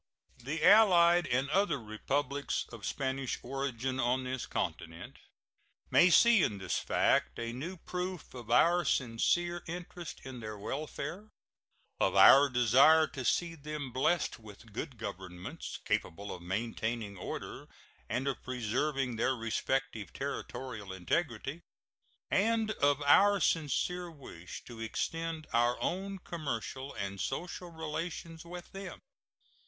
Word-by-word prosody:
The 145 +6 -4
allied 175 -5 +7
and 130 +3 +1
other 195 -5 +2
Republics 135 +6 -2
of 115 -3 -6
Spanish 135 -1 -2
origin 130 -1 -3
on 130 +1 +1
this 130 -1 -4
continent 80 +1 -4 0.7
may 180 - +7
see 235 +3 +6
in 105 - +1
this 95 -2 -1
fact - - +2
a 115 0 -3
new 165 +10 -5
proof 180 0 -5
of 120 -3 -9
our 170 +9 +5
sincere 170 +7 +1
interest 175 -1 -7
in 130 -2 -7
their 110 -2 -6
welfare, 155 - -5 0.7
of - - +2
our 140 +1 +8
desire 130 +6 +6
to 135 -4 -6
see 170 +7 +1
them 150 -3 -6
blessed 135 +4 +1
with 110 0 -14
good 125 +3 -5
governments, 95 -4 -6
capable 100 +5 -2
of 90 - -9
maintaining 110 +3 -3
order 90 - -6 0.4
and 130 +3 -1
of 135 - -2
preserving 130 +1 -1
their 130 +3 +2
respective 115 -2 -2
territorial 110 -7 -5
integrity, 135 - -2 0.7
and 220 +2 +2
of 145 -6 +2
our 200 +8 +6
sincere 175 +3 0
wish 130 - -10
to 120 -2 -11
extend 160 +8 -3
our 120 +1 +3
own 195 +2 -2
commercial 140 - -5
and 100 0 -4
social 175 +5 -4
relations 165 0 -5
with 175 +1 -9
them. 195 -2 -7
135 Hz, 125 wpm, -32 LUFS, 115-170 Hz, 0.7 s, our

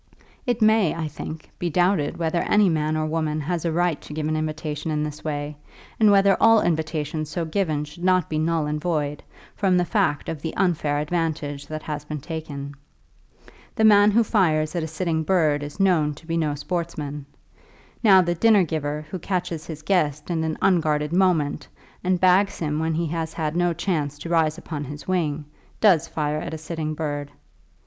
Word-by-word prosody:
It 240 -2 +1
may, 215 -6 +4
I 165 -2 -3
think, 155 +1 -8
be 175 - -1
doubted 175 -2 +1
whether 170 0 0
any 210 -2 +3
man 155 -1 0
or 155 - 0
woman 155 -1 -1
has 170 +2 -2
a 165 - +1
right 175 -1 0
to - - -10
give 155 -1 -2
an 155 - 0
invitation 155 0 -3
in 150 -1 0
this 150 0 -6
way, 145 -1 -4 0.4
and 215 -1 +6
whether 195 -1 +5
all 225 0 +7
invitations 155 -2 -1
so 165 +2 -2
given 160 -3 -1
should 150 +4 -12
not 185 -2 +3
be 155 - -2
null 160 -1 +1
and 150 0 -2
void, 150 -4 -1 0.3
from 190 -3 +2
the 180 - +2
fact 195 -8 0
of 160 -3 -4
the 160 - -5
unfair 155 -6 +1
advantage 150 -2 -2
that 155 0 -6
has 150 -1 -4
been 150 0 -5
taken. 145 -2 -6 1.0
The 220 - +1
man 205 -1 +7
who 230 +3 +4
fires 155 -8 +1
at 170 - 0
a 160 - -3
sitting 160 0 -1
bird 155 -4 +2
is 145 +5 -8
known 165 -6 +2
to 155 - -16
be 165 0 -2
no 155 -3 0
sportsman. 150 -2 -4 0.8
Now, 190 -4 +7
the 175 0 0
dinner 210 +2 +4
giver 150 -2 -3
who 185 - -4
catches 175 -4 -3
his 155 -2 -7
guest 150 -4 0
in 160 -2 0
an 160 -1 -2
unguarded 155 -4 +2
moment, 170 -6 +1 0.4
and 185 0 +1
bags 185 +2 +4
him 150 -2 -2
when 160 0 0
he 170 +1 0
has 160 0 -3
had 155 -1 -2
no 175 0 +2
chance 155 -5 -2
to 165 - -7
rise 160 -2 +2
upon 145 -3 -5
his 145 +1 -9
wing, 155 -5 -1 0.3
does 175 -7 +4
fire 150 -1 -2
at 160 - -5
a - - -5
sitting 155 -1 -4
bird. 145 -2 -3
160 Hz, 195 wpm, -24 LUFS, 150-175 Hz, 1.0 s, all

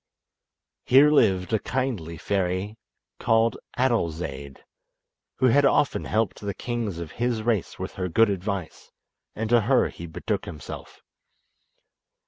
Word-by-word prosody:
Here 140 +4 +6
lived 95 -9 +3
a 110 - +3
kindly 110 -13 -3
fairy 95 +3 -1 0.4
called 115 0 +2 0.2
Adolzaide, 80 - -2 0.7
who - - +1
had 145 +5 +4
often 140 +1 +2
helped 110 -1 -1
the 100 -2 -4
kings 115 -7 -3
of 85 -2 -6
his 120 -3 0
race 110 -5 -1
with - - -5
her 90 - -1
good 110 +5 +4
advice, 95 -2 -4 0.5
and 110 +1 -2
to 120 -1 +6
her 125 +5 +3
he 85 - -9
betook 80 - -3
himself. 75 - -9
105 Hz, 125 wpm, -25 LUFS, 90-120 Hz, 0.7 s, Here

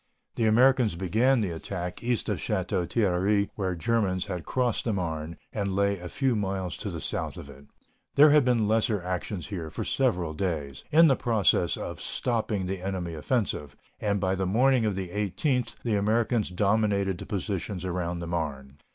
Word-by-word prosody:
The 115 - 0
Americans 120 -1 +4
began 110 +8 +2
the 95 -5 -1
attack 90 +2 -5
east 120 -2 0
of - - -1
Château 85 -2 -1
Thierry, 100 0 +1
where 95 -3 -2
the - - -5
Germans 95 -2 0
had 90 -4 -5
crossed 125 -3 0
the 115 - +1
Marne 80 -3 -3 0.2
and 100 -3 -1
lay 100 0 +1
a 90 0 -7
few 130 +2 +1
miles 95 -5 -2
to - - -4
the - - -5
south - - -3
of 70 - -9
it. 70 +1 -15 0.5
There 145 +1 +8
had 150 -1 +6
been 120 -4 +2
lesser 110 -1 +2
actions 90 -1 -4
here 85 -6 -4
for - - -4
several 90 -12 0
days, 75 -6 -3
in 165 +2 +7
the 135 - +4
process 105 -8 +2
of - - -6
stopping 110 -5 -1
the 95 0 -3
enemy 90 -3 -3
offensive, 80 - -2 0.2
and 100 -1 0
by 95 -1 +1
the 95 -1 -1
morning 125 +3 +3
of 105 - -1
the 95 -2 -4
18th 105 - -1
the 115 - 0
Americans 110 +2 +1
dominated 100 -1 +1
the - - -8
positions 95 -1 -3
around 90 -1 -2
the 85 - -5
Marne. 70 -5 -4
100 Hz, 185 wpm, -27 LUFS, 90-115 Hz, 0.5 s, There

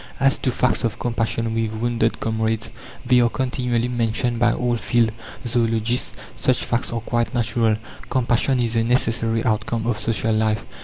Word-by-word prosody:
As 135 0 +3
to - - 0
facts 125 0 +1
of 115 -2 -1
compassion 115 -1 -1
with 115 -1 -1
wounded 115 -1 0
comrades, 110 0 -1 0.3
they 125 0 +5
are 120 - +3
continually 125 -2 -1
mentioned 120 0 0
by 120 0 +4
all 120 0 0
field 115 -1 +1 0.3
zoologists. 115 0 0 0.2
Such 130 -1 +1
facts 120 +1 -1
are 115 -1 -2
quite 120 +2 -1
natural. 115 -1 +2 0.3
Compassion 125 0 +2
is 115 0 0
a 115 - +3
necessary 115 -1 +1
outcome 110 0 0
of 115 -2 0
social 110 +1 0
life. 110 -5 +1
115 Hz, 160 wpm, -22 LUFS, 115-120 Hz, 0.3 s, they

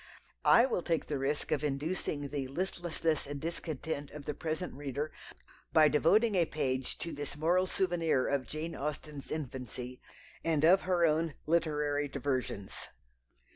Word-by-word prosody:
I 235 - +8
will 240 -8 0
take 165 -3 0
the 145 -3 -2
risk 140 +2 -1
of 145 - +1
inducing 145 0 -2
the 140 -2 -2
"listlessness 165 -1 -1
and 145 0 -4
discontent" 160 -2 -3
of 150 -1 -9
the 150 - -2
present 160 +4 -3
reader 145 +2 -3 0.6
by 155 -1 +7
devoting 205 +10 +4
a 175 -3 +4
page 130 -4 -1
to 170 - -4
this 145 0 -5
moral 175 +4 +3
souvenir 170 -8 +1
of 140 -2 0
Jane 155 +2 -4
Austen's 145 0 -5
infancy 125 -3 -5 0.4
and 160 -2 +3
of 185 +4 +7
her 175 -2 +4
own 160 0 +1
literary 150 -3 +1
diversions. 130 -7 -3
150 Hz, 145 wpm, -32 LUFS, 140-165 Hz, 0.6 s, I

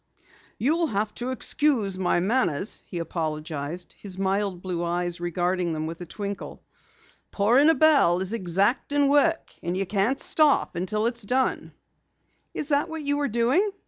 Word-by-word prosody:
"You'll 320 +7 +1
have 210 -3 -1
to 245 - -2
excuse 255 -7 0
my 180 -1 +2
manners," 195 - 0
he 180 - -6
apologized, 160 0 -4
his 190 -3 -7
mild 195 -1 -1
blue 175 -2 -3
eyes 175 0 -2
regarding 175 0 -1
them 155 0 -3
with 165 +2 -6
a 175 - -7
twinkle. 200 +2 -6 0.7
"Pouring 240 +9 +4
a 325 - +5
bell 280 - +4
is 190 +3 -3
exacting 230 +9 +1
work 305 +3 +2
and 175 +2 -2
you 195 - -1
can't 205 +7 0
stop 305 -3 +3
until 210 +5 -1
it's 235 0 -1
done." 255 +5 -1 0.8
"Is 300 - -2
that 285 0 +1
what 320 -1 -5
you 285 0 +1
were 290 -1 0
doing?" 250 - +2
200 Hz, 155 wpm, -25 LUFS, 175-270 Hz, 0.8 s, a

